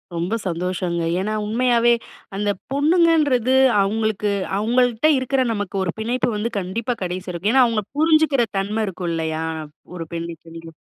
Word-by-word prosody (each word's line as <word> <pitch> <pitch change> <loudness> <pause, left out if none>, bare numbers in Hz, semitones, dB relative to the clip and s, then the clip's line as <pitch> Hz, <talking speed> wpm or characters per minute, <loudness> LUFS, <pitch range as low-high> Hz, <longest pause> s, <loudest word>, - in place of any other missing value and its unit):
ரொம்ப 175 +6 -2
சந்தோஷங்க. 175 0 -2 0.2
ஏன்னா 210 +3 -2
உண்மயாவே, 235 +1 +3 0.4
அந்த 205 +1 -1 0.2
பொண்ணுங்கன்றது, 290 -5 +3 0.3
அவுங்களுக்கு 210 0 0 0.3
அவங்ள்ட்ட 245 +5 +2
இருக்குற 260 +1 0
நமக்கு 205 -2 -4
ஒரு 175 - -1
பிணைப்பு 240 +3 0
வந்து 225 +3 -2
கண்டிப்பா 230 +6 -3
கடைசி 180 +1 -4
வரைக்கும் 185 +7 -1
ஏன்னா 260 -2 +6
அவுங்க 225 -3 0
புரிஞ்சுக்குற 310 -5 +3
தன்ம 210 +3 -1
இருக்கும் 180 -2 -4
இல்லயா? 160 0 -2 0.5
ஒரு 165 - -4
பெண்ணுக்கு 165 0 -7
நீங்க 165 0 -10
215 Hz, 140 wpm, -21 LUFS, 180-250 Hz, 0.5 s, ஏன்னா